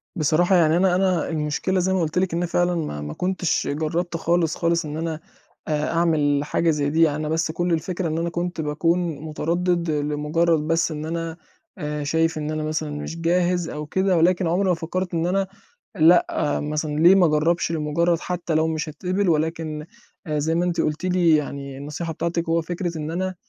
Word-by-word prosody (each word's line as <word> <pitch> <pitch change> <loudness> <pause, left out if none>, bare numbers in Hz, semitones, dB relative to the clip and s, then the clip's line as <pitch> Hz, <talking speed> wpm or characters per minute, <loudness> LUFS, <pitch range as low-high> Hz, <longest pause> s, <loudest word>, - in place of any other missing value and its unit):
بصراحة 170 +3 +3
يعني 165 -2 +4
أنا 180 0 +3
أنا 185 -2 +1
المشكلة 160 +4 -1
زَي 190 +1 +1
ما 190 - +1
قُلت 160 +1 -2
لِك 185 -2 0
إن 170 +1 0
فعلًا 175 +1 +1
ما 150 - -3
ما 75 0 -5
كنتش 180 -2 -1
جرّبت 165 +4 -2
خالص، 165 -1 +1
خالص 170 0 +1
إن 150 0 -5
أنا 160 -1 -3 0.5
أعمل 150 -2 +1
حاجة 165 +3 0
زَي 145 -2 +1
دي 160 +2 +4
أنا 155 0 -3
بس 160 0 0
كُلّ 175 +1 -1
الفكرة 175 +2 -2
إن 160 0 -2
أنا 170 +1 -1
كنت 175 0 -3
باكون 160 +3 +1 0.2
متردِّد 170 +2 -1
لمجرّد 150 +3 +1
بس 165 +1 +1
إن 155 0 -5
أنا 165 0 -4 0.4
آآ، 150 0 -3
شايف 160 +2 +1
إن 155 0 -3
أنا 155 0 -2
مثلًا 155 0 -2
مش 150 +3 -6
جاهز 175 0 +1
أو 150 0 -5
كده 190 +3 +1
ولكن 175 +2 +3
عمري 185 +3 +1
ما - - +4
فكّرت 175 +3 -4
إن 165 0 0
أنا 195 +1 +1 0.5
لأ، 160 -3 +3
مثلًا 150 +1 -2
ليه 170 +4 +7
ما 190 -2 +5
أجرّبش 160 +2 +1
لمجرّد 165 +2 +1
حتّى 175 -2 -3
لو 160 +1 +3
مش 155 0 -2
هاتقبل، 185 +6 -1
ولكن 155 -1 -1 0.4
زَي 155 +2 0
ما 175 - +1
أنتِ 175 -1 0
قُلتِ 155 +4 -1
لي 180 -3 +4
يعني 140 -2 -4
النصيحة 150 +4 -5
بتاعتِك 170 +1 -2
هو 165 +1 +2
فكرة 175 0 -4
إن 155 0 -4
أنا 185 +2 -2
165 Hz, 190 wpm, -23 LUFS, 155-175 Hz, 0.5 s, ليه